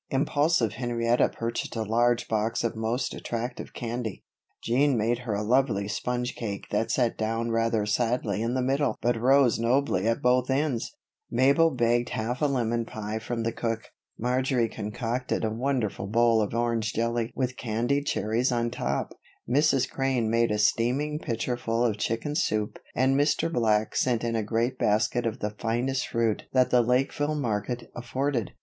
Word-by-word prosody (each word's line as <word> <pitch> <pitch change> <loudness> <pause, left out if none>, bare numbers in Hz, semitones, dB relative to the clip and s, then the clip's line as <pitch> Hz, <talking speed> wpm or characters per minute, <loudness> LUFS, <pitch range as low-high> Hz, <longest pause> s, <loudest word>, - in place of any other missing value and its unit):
Impulsive 145 -3 +1
Henrietta 120 0 +1
purchased 115 +1 -4
a 110 - -1
large 120 +2 +2
box 110 +1 0
of 115 - -1
most 115 +4 -1
attractive 120 +2 -5
candy, 115 -3 -5 0.4
Jean 130 +3 +2
made 115 +2 +1
her 120 -4 -3
a 105 - -2
lovely 115 -4 +2
sponge 125 +4 -2
cake 100 -4 -5
that 110 +2 0
sat 120 -1 +1
down 115 +1 -1
rather 115 -2 +1
sadly 115 -1 0
in 115 +2 -1
the 130 - +1
middle 135 +3 +1
but 120 0 +1
rose 125 +1 +4
nobly 115 -4 +1
at 115 - +1
both 125 +1 +2
ends; 135 - -1 0.3
Mabel 140 +5 +4
begged 120 -2 +1
half 120 +5 -3
a 150 - +4
lemon 120 -4 0
pie 110 -1 -5
from 115 +1 -3
the 115 - 0
cook; 115 -1 -3 0.3
Marjory 125 0 +1
concocted 115 +3 -3
a 110 - -1
wonderful 115 -4 -1
bowl 115 +1 +3
of 105 +1 -2
orange 115 -2 0
jelly 115 0 -1
with 125 -1 -1
candied 120 +5 -1
cherries 115 +4 0
on 120 -1 0
top, - - -2 0.3
Mrs. 135 0 +3
Crane 130 -5 0
made 115 0 +3
a 105 - 0
steaming 125 +8 +1
pitcherful 115 -1 -1
of 110 -3 0
chicken 115 +7 -1
soup 110 - -1 0.2
and 130 +1 +3
Mr. 155 +3 +1
Black 110 -4 +1
sent 120 -3 +1
in 115 -1 -1
a 110 - +1
great 115 +4 -1
basket 110 +3 +1
of 115 +2 -4
the 105 - -1
finest 125 +3 -1
fruit 115 -2 0
that 130 -1 +3
the 125 - +5
Lakeville 135 +5 +1
market 120 -2 -3
afforded. 125 -1 -2
120 Hz, 165 wpm, -27 LUFS, 115-130 Hz, 0.4 s, the